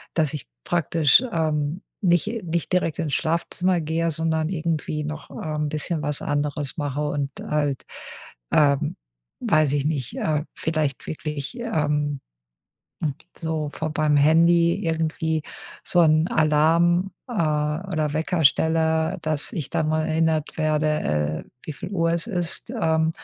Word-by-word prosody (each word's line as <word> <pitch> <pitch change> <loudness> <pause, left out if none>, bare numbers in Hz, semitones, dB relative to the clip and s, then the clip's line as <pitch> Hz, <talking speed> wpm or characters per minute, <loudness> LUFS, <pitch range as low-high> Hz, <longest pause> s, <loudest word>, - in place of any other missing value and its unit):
dass 155 -3 +1
ich 150 - -6 0.2
praktisch, 165 - +4
ähm, 155 +1 0 0.2
nicht 195 +4 +1
nicht 170 +2 -2
direkt 170 -2 +1
ins 155 -4 -1
Schlafzimmer 170 +2 0
gehe, 165 +2 0
sondern 160 0 0
irgendwie 155 -3 -2
noch, 155 0 -6
ähm, 150 -1 -3
bisschen 155 +2 -2
was 145 -1 -2
anderes 145 -1 -2
mache 145 -1 -2
und 140 -1 -2
halt, 145 -3 0 0.7
ähm, 145 0 +3 0.5
weiß 155 -2 +3
ich 140 -1 +1
nicht, 140 -6 -2
äh, 150 -1 0
vielleicht 155 -3 -1
wirklich, 150 - -5
ähm, 150 - 0 1.2
so 160 -3 -2
vor 155 0 -3
beim 150 -1 +2
Handy 170 +3 +5
irgendwie 160 -1 0 0.4
so 175 - +3
'n 155 +1 +4
Alarm, 165 +4 +3 0.2
äh, 245 - -6
oder 155 -1 0
Wecker 160 +1 0
stelle, 160 +4 +3
dass 155 -2 -1
ich 150 - -4
dann 155 - 0
mal 155 0 +1
erinnert 160 -1 +1
werde, 155 0 +1 0.6
äh, - - -25
wieviel 160 +4 -6
Uhr 165 -4 +1
es 170 0 -1
ist. 180 +2 -2
Ähm, 160 0 +2
155 Hz, 135 wpm, -24 LUFS, 150-165 Hz, 1.2 s, Handy